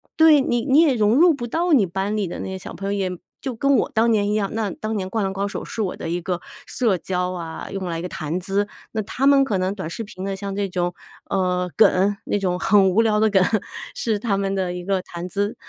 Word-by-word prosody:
对， 315 -3 +6
你 240 -2 0
你 280 +1 +5
也 285 -6 +4
融 215 0 +3
入 340 +5 +6
不 245 -5 -3
到 330 +7 0
你 220 -8 +5
班 195 +4 -2
里 200 -3 0
的 - - -6
那 - - -4
些 190 0 -4
小 - - -9
朋 195 +1 -5
友， 190 -2 -1
也 180 - -7 0.2
就 260 -4 -4
跟 275 +4 +2
我 - - +1
当 225 +1 +3
年 205 -2 +2
一 210 - 0
样， 205 -2 0
那 215 -4 -1
当 215 +4 -4
年 190 - -2
《灌 220 -3 0
篮 190 - -1
高 195 +1 -2
手》， 200 - -5
是 - - -8
我 190 - -2
的 165 - -6
一 175 +1 -1
个 175 0 -3 0.2
社 220 -7 +1
交 180 +1 -2
啊， 165 -2 -6
用 195 -1 -4
来 165 -1 -3
一 - - -4
个 180 - -5
谈 155 +4 -3
资。 195 +3 -1 0.3
那 220 - 0
他 265 +6 0
们 280 -1 +6
可 210 -8 -1
能 185 +2 0
短 190 -6 -5
视 225 +7 -5
频 190 -3 -9
的， 195 0 -2
像 195 0 -5
这 200 -1 -1
种， 175 -1 -1 0.4
呃， 180 -1 0
梗， 195 +2 +4
那 205 - 0
种 180 -2 -1
很 195 -2 +4
无 210 +5 +3
聊 215 -1 +2
的 220 - +4
梗， 195 -2 +4 0.5
是 220 -3 0
他 200 -2 -1
们 195 0 -1
的 185 -2 -1
一 180 - -6
个 195 0 0
谈 175 +1 -7
资。 205 +3 -1
195 Hz, 285 characters per minute, -22 LUFS, 185-220 Hz, 0.5 s, 对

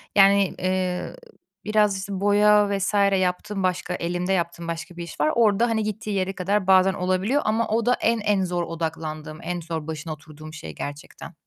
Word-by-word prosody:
yani, 200 -1 +5
eee, 185 -1 -1 0.5
biraz, 210 -2 +2
işte, 195 0 -5
boya 205 0 +4
vs. 195 +2 -1 0.3
yaptığım, 185 +2 -2
başka 180 -1 -1
elimde 175 +2 -1
yaptığım 170 -2 -2
başka 170 +1 -6
bir 170 - -4
iş 170 - -10
var. 150 +1 +3
Orada, 230 0 +3
hani, 220 -1 0
gittiği 215 0 -4
yere 190 -1 -1
kadar 195 +1 -1
bazen 190 0 +5
olabiliyor 185 +10 0
ama 220 +1 +1
o 225 +1 0
da 245 - +4
en 230 0 +2
en 205 -2 +1
zor 175 -1 -1
odaklandığım, 160 -2 -5
en 175 0 -3
zor 160 -2 -5
başına 160 0 -5
oturduğum 155 0 -12
şey 80 - -8
gerçekten. 145 +4 -8
185 Hz, 180 wpm, -24 LUFS, 170-205 Hz, 0.5 s, yani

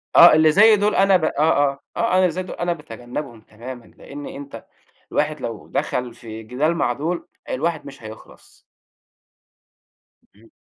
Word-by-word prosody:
آه، 170 -2 +10
اللي 155 0 +5
زي 215 +5 +7
دول 205 +1 +1
أنا 195 -1 +5
ب 160 - -2
آه، - - +2
آه، 145 -3 +2 0.2
آه، 230 - +1
أنا 185 - +4
اللي 180 -2 +3
زي 185 +3 -4
دول 185 - -8
أنا 175 0 -1
باتجنّبهم 120 -4 -8
تمامًا 120 +3 -10
لأن 145 0 -11
أنت 140 -5 -9 0.5
الواحد - - -1
لو - - -6
دخل 125 -2 -2
في 110 -1 -10
جدال 140 +9 0
مع 120 -7 0
دول 165 +6 -3 0.2
الواحد 160 +4 -2
مش 135 -4 -12
هيخلّص. 110 0 -13 1.7
امم. 115 +2 -21
145 Hz, 165 wpm, -21 LUFS, 120-170 Hz, 1.7 s, آه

